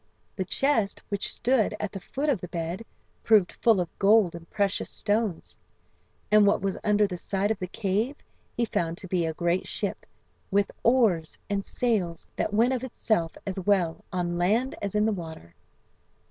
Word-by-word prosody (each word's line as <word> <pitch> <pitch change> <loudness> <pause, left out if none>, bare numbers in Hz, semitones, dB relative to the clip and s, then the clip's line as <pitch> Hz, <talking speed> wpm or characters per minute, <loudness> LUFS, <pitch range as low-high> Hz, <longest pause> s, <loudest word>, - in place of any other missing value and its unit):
"The 190 - -2
chest 225 -1 +1
which 200 -1 +1
stood 235 -4 +1
at 210 - -3
the 195 - -6
foot 280 +10 -4
of 265 - +1
the 180 - -5
bed" 170 +4 -4 0.4
proved 210 -5 +4
full 225 -4 +3
of 175 -2 -4
gold 200 -3 +5
and 170 0 -10
precious 200 -1 0
stones; 210 -4 -2 0.7
and 210 -1 +6
"what 200 - +3
was 195 0 -1
under 210 0 +3
the 180 -3 -5
side 200 +3 -1
of 215 - -2
the 185 - -3
cave" 215 +7 -1 0.4
he 235 - +2
found 170 -6 -2
to 190 - -8
be 175 -2 0
a 160 - -2
great 175 +2 0
ship, - - -4 0.4
with 200 +1 +2
oars 220 -10 +2
and 200 -1 0
sails 195 -10 -1
that - - -1
went 230 +5 +3
of 255 -1 -2
itself 215 -9 -1
as 195 -1 -3
well 180 -4 +1
on 175 -2 -1
land 220 +9 +2
as 200 0 -3
in 210 0 +3
the 220 - +2
water. 160 - -8
200 Hz, 180 wpm, -27 LUFS, 175-220 Hz, 0.7 s, and